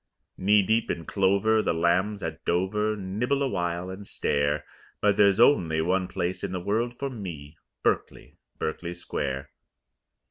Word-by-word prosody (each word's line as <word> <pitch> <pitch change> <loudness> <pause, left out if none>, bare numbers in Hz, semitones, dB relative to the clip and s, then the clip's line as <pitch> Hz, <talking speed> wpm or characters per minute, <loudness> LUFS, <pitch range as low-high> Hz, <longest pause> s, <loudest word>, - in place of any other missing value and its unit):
Knee 100 +2 +4
deep 110 +4 +1
in 85 - -3
clover 100 +4 +2
the 85 - 0
lambs 95 +5 +1
at 80 0 -5
Dover 105 +5 0
Nibble 110 +9 -1
awhile 85 -7 -2
and 100 +2 -8
stare; 70 +1 0 0.3
But 105 -1 +3
there's 100 0 +4
only 85 - +4
one 90 +3 +1
place 90 0 -3
in - - -3
the 90 - -2
world 115 +6 -1
for 140 -1 -3
me, 80 - -8 0.2
Berkeley - - -2 0.2
Berkeley 85 +2 -3
Square. 70 -4 -4
95 Hz, 145 wpm, -27 LUFS, 85-105 Hz, 0.3 s, Knee